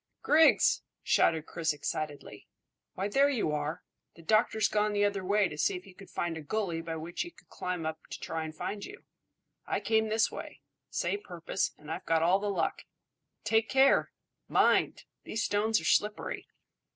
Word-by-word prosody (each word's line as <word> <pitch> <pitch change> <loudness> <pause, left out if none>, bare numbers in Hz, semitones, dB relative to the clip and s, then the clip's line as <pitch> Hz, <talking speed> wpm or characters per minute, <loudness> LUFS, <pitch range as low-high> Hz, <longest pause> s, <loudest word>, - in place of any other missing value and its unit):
"Griggs!" 315 +2 +5 0.2
shouted 160 -2 +3
Chris 165 -2 -1
excitedly. 145 0 -5 0.5
"Why, 195 - -1
there 275 +7 +4
you 230 - 0
are! 150 +1 -3 0.3
The 165 - -15
doctor's 215 +4 +3
gone 210 0 +1
the 205 0 +3
other 200 -2 -1
way 200 +1 +3
to 150 -3 -9
see 195 - +2
if 180 - -7
he 195 - -15
could 195 +1 -14
find 170 -1 -2
a 160 - -6
gully 170 0 -2
by 165 0 -5
which 165 +2 -5
he 345 - -3
could 180 - -22
climb 180 -3 -4
up 160 0 -3
to - - -7
try 160 0 -3
and 155 0 -7
find 205 +3 -4
you. 410 - -10 0.6
I - - 0
came 220 -1 +1
this 220 +1 +2
way. - - -8 0.3
Same 410 - -1
purpose, 175 - -3
and 150 +1 -10
I've - - -5
got 165 0 +3
all 180 +4 +4
the 205 0 -2
luck. 180 -5 -1 0.6
Take 220 +1 +2
care! 270 +1 +4 0.4
Mind! - - +3 0.2
These 225 - -2
stones 215 +2 +2
are - - -8
slippery." 210 0 0
195 Hz, 185 wpm, -30 LUFS, 160-215 Hz, 0.6 s, Griggs